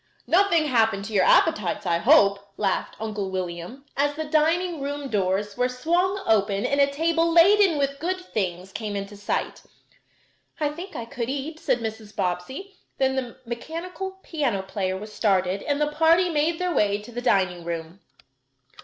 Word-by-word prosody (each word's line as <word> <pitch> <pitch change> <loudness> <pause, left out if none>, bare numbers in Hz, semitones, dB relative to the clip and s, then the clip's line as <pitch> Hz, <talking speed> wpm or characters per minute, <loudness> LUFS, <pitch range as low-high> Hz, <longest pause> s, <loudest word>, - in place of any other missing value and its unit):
"Nothing 345 -3 +3
happened 225 -7 +2
to 220 - -7
your 195 - +4
appetites, 210 - +3
I 170 -2 +1
hope," 200 +3 +4
laughed 195 -3 -1
Uncle 210 -3 -3
William, 185 +8 -5
as 290 +1 +1
the 315 - -3
dining 325 +2 +1
room 285 0 -4
doors 200 0 0
were 250 +1 +1
swung 345 +9 0
open 205 -1 +2
and 280 +2 +2
a 280 - +5
table 330 +3 +1
laden 370 0 +6
with 280 0 -1
good 365 +4 -2
things 190 - -4
came 210 0 -4
into 200 +1 -5
sight. 205 0 -3 1.0
"I 300 -2 +1
think 345 +4 -8
I 235 -3 -4
could 235 +1 -4
eat," 285 +4 -4
said 240 - 0
Mrs. 220 -2 -6
Bobbsey, 260 - -3 0.2
then 265 0 +1
the 255 -3 -4
mechanical 335 +10 -6
piano 260 - -1
player 190 -1 -2
was 210 +2 -9
started, 190 -2 +1
and 285 -1 -1
the 300 0 +1
party 330 +4 +4
made 320 +1 +1
their 360 0 -1
way 205 -5 +2
to 210 +4 -12
the 240 +1 -5
dining 185 -7 +1
room. 170 +1 -5
250 Hz, 170 wpm, -25 LUFS, 200-320 Hz, 1.0 s, laden